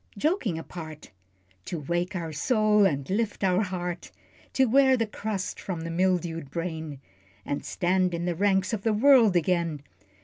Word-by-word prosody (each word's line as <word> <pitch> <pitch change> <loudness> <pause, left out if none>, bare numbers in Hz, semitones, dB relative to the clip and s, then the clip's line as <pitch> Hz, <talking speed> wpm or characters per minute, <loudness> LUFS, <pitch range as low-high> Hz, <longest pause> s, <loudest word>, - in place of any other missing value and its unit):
Joking 245 - 0
apart 160 -4 -9 0.5
To 170 - -4
wake 175 +5 -2
our 165 -3 -4
soul, 210 - +3
and 140 -5 -3
lift 210 +1 -2
our 185 +1 +3
heart, 180 -3 -4 0.4
To 265 - +4
wear 265 +2 +4
the 230 - +1
crust 210 -2 -4
from 175 -4 -5
the 165 +1 -5
mildewed 170 -4 0
brain, 160 -2 -5 0.5
And 145 - -3
stand 180 0 0
in 170 +1 -3
the 175 - 0
ranks 195 +3 +1
of 215 - -2
the 225 +1 +1
world 230 -3 +5
again. 170 -3 0
180 Hz, 160 wpm, -26 LUFS, 165-210 Hz, 0.5 s, world